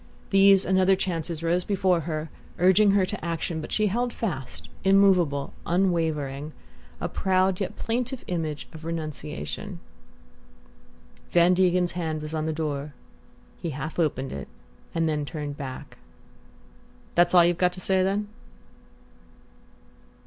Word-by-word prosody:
These 195 0 +6
and 190 0 +2
other 190 +1 +5
chances 170 -3 -3
rose 175 +2 +1
before 185 -3 +2
her, 155 0 -3 0.3
urging 190 +4 +5
her 195 -2 +4
to - - -5
action; 165 -1 -2
but 155 - -8
she 215 - +2
held 240 +5 0
fast, 130 - -5 0.2
immovable, 185 -8 +3
unwavering, 160 -5 0 0.5
a - - -2
proud 185 -1 +1
yet 195 - -3
plaintive 245 +2 -2
image 160 -4 -3
of 160 0 -10
renunciation. 165 +4 -5 1.5
Van 175 +1 +5
Degen's 180 -1 +2
hand 160 -3 -3
was 155 +1 -6
on 155 0 -1
the - - 0
door. 150 -2 -3 0.7
He 170 - -2
half 150 +3 -5
opened 135 -5 0
it 70 - -6 0.5
and 165 -1 +2
then 150 -1 0
turned 145 -1 -5
back. 135 -3 -8 1.1
"That's 175 +1 +4
all 175 -1 +8
you've 175 0 +1
got 180 -1 +3
to 185 - -8
say, 190 +1 +1
then?" 200 +2 0
170 Hz, 135 wpm, -26 LUFS, 155-190 Hz, 1.5 s, all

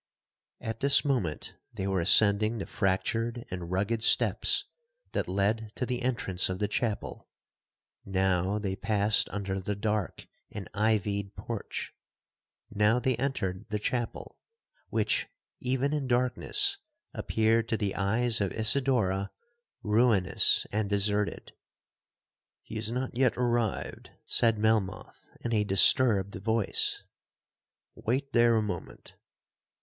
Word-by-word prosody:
'At 110 0 -5
this 140 +2 +5
moment 120 - -2 0.2
they 95 - -5
were 95 -1 0
ascending 110 +4 +4
the 100 - -4
fractured 115 +4 -1
and 90 -2 -5
rugged 100 +5 -1
steps - - +3 0.5
that - - -2
led 105 +3 -1
to 125 - -2
the 125 0 -3
entrance 115 -8 0
of 95 - -3
the 105 - -1
chapel, 105 0 -3 0.7
now 95 0 0
they 100 -3 -3
passed 105 0 +1
under 100 -1 -3
the 100 +2 -3
dark 105 -1 -3 0.2
and 100 -3 -7
ivied 100 -1 -1
porch,—now 110 0 -4
they 125 +1 0
entered 95 -10 -3
the 105 - -1
chapel, 120 +3 -4 0.5
which, - - 0 0.3
even 130 +3 -1
in 145 -3 -2
darkness, 130 - +1 0.3
appeared 115 +1 0
to 110 - 0
the 100 -2 -2
eyes 110 +3 +1
of 100 - 0
Isidora 110 -5 +1 0.5
ruinous 105 -3 +3
and 105 -1 -1
deserted. 105 0 -1 1.1
'He - - -12
has 110 0 -1
not 125 0 -3
yet 130 -1 +2
arrived,' 120 -3 -2 0.2
said 115 -2 +2
Melmoth, 105 -3 -1
in 120 - -3
a 105 -2 +2
disturbed 100 0 +5
voice; 110 +1 0 0.9
'Wait 135 +4 -3
there 120 -1 +4
a 110 - +2
moment.' 95 -5 -7
110 Hz, 120 wpm, -28 LUFS, 100-120 Hz, 1.1 s, this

